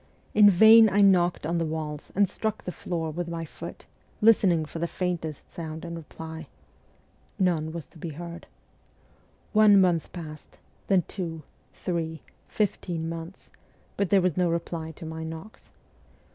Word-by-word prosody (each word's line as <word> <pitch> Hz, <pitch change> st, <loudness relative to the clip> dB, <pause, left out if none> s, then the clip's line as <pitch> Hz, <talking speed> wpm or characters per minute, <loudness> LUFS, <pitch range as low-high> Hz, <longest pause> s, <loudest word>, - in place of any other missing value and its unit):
In 210 Hz, -1 st, +8 dB
vain 220 Hz, +4 st, +8 dB
I 205 Hz, +1 st, +3 dB
knocked 180 Hz, -5 st, +4 dB
on 170 Hz, +2 st, 0 dB
the -, -, +1 dB
walls 155 Hz, -2 st, -5 dB
and 200 Hz, +1 st, +4 dB
struck 220 Hz, +3 st, -3 dB
the 180 Hz, -, -4 dB
floor 165 Hz, -3 st, -4 dB
with 175 Hz, +2 st, -4 dB
my 165 Hz, -1 st, -4 dB
foot, -, -, -10 dB, 0.3 s
listening 195 Hz, -7 st, +4 dB
for 165 Hz, -, -7 dB
the 170 Hz, -, 0 dB
faintest 170 Hz, -5 st, -4 dB
sound 160 Hz, 0 st, -6 dB
in 170 Hz, -, -6 dB
reply. 160 Hz, 0 st, -8 dB, 0.9 s
None 170 Hz, -5 st, +1 dB
was 165 Hz, -3 st, -6 dB
to 160 Hz, -, -18 dB
be 165 Hz, -, -5 dB
heard. 170 Hz, +2 st, -8 dB, 1.1 s
One 210 Hz, -2 st, +7 dB
month 175 Hz, -4 st, +2 dB
passed, 155 Hz, -4 st, -9 dB, 0.3 s
then 190 Hz, -3 st, +3 dB
two, 165 Hz, -3 st, -6 dB, 0.3 s
three, 165 Hz, -3 st, -3 dB, 0.2 s
fifteen 175 Hz, -5 st, -2 dB
months, 165 Hz, +2 st, -8 dB, 0.4 s
but 200 Hz, -3 st, 0 dB
there 195 Hz, -2 st, +5 dB
was 180 Hz, 0 st, +2 dB
110 175 Hz, +1 st, +1 dB
reply 165 Hz, -1 st, -3 dB
to 160 Hz, -, -10 dB
my 160 Hz, 0 st, -6 dB
knocks. 160 Hz, +6 st, -9 dB
170 Hz, 155 wpm, -27 LUFS, 160-185 Hz, 1.1 s, In